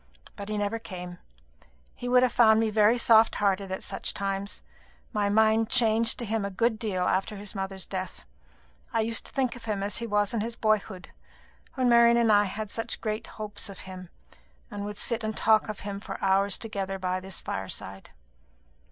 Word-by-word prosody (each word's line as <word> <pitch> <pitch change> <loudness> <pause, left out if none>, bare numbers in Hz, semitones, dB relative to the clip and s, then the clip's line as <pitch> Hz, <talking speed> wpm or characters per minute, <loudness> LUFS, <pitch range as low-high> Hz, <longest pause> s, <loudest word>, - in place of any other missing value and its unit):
But 200 0 -7
he 215 - -2
never 205 +2 -1
came. 180 -4 -8 0.7
He 245 - -6
would 250 0 +5
have 255 - +3
found 220 -2 +6
me 225 -1 +1
very 215 +2 +4
soft 225 -1 +5
hearted 195 -1 0
at 190 - -4
such - - -3
times. 195 0 -3 0.5
My 205 -2 +1
mind 220 +1 +3
changed 230 -2 +3
to 240 - -4
him 220 -1 -1
a 200 - -2
good 220 +3 0
deal 200 -6 -1
after 195 +4 0
his 200 0 -4
mother's 195 -2 -3
death. 185 -1 -5 0.7
I 225 - +2
used 230 +1 0
to - - -11
think 260 -3 0
of 240 - -11
him 205 -3 -2
as 200 -1 -2
he 235 - -3
was 205 +1 +1
in 225 - 0
his 230 +2 -4
boyhood, 215 -4 -1 0.7
when 255 -2 +1
Marian 235 0 +6
and 230 -2 +4
I 205 0 +5
had 205 +2 -5
such 225 - -3
great 215 -1 -3
hopes 215 0 -4
of 195 - -9
him, 185 -1 -9 0.6
and 205 0 -5
would 205 0 -6
sit 235 -1 -1
and 215 0 -3
talk 220 0 +3
of 210 - -6
him 200 -1 -5
for 200 -1 -7
hours 195 0 +3
together 195 -3 -4
by 185 0 -2
this 190 -1 -6
fireside. 95 0 -6
210 Hz, 195 wpm, -27 LUFS, 195-225 Hz, 0.7 s, found